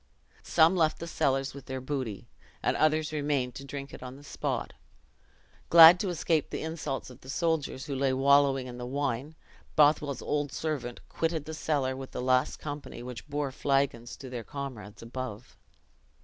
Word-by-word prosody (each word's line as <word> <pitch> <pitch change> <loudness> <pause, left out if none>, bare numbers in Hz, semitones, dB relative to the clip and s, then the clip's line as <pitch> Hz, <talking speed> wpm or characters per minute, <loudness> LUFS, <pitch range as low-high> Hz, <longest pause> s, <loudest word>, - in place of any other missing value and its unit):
Some 165 +2 +4
left 160 -3 +2
the 170 - -6
cellars 135 -4 0
with 140 -1 -11
their 130 0 -3
booty, 130 -6 -4 0.4
and - - +2
others 155 0 +2
remained 145 -4 0
to 135 - -8
drink 140 0 -7
it - - -9
on 125 0 -7
the 140 - -14
spot. - - -3 1.0
Glad 170 +1 +10
to 195 - -1
escape 165 -3 0
the - - -4
insults 155 -5 -4
of 125 +2 -15
the 130 - -13
soldiers 160 -4 -1
who 140 - -4
lay 135 0 +1
wallowing 135 0 +4
in 125 -1 -8
the 120 - -4
wine, 140 +2 -2 0.4
Bothwell's 145 -2 +3
old 145 -1 -1
servant 140 -7 -3
quitted 165 -2 -1
the 160 - -6
cellar 145 -4 0
with 135 0 -8
the - - -4
last 130 +2 +2
company 145 -5 -7
which 125 -1 -8
bore 145 -1 -2
flagons 135 -3 0
to 135 - -9
their 125 -2 -5
comrades 115 -6 -7
above. 120 -1 -7
140 Hz, 175 wpm, -29 LUFS, 130-150 Hz, 1.0 s, Glad